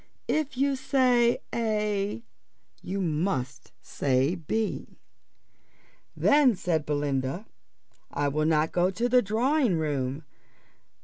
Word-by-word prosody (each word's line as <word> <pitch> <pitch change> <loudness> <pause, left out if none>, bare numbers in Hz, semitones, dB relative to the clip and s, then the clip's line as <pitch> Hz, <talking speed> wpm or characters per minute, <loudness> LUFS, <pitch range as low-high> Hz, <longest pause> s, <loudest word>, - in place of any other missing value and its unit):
If 305 -4 -1
you 275 +1 +2
say 255 -3 +2
a 210 - -1 0.6
you 195 +1 -3
must 150 - -2
say 135 +3 0
b." 205 +5 -3 1.2
"Then," 285 -5 +4
said 165 -5 -1
Belinda, 145 +4 -1 0.6
"I 145 0 -1
will 155 +2 0
not 160 0 +2
go 180 +1 +2
to 230 +6 -1
the 250 +1 +4
drawing 240 - +1
room." 145 -2 -2
185 Hz, 105 wpm, -27 LUFS, 145-240 Hz, 1.2 s, Then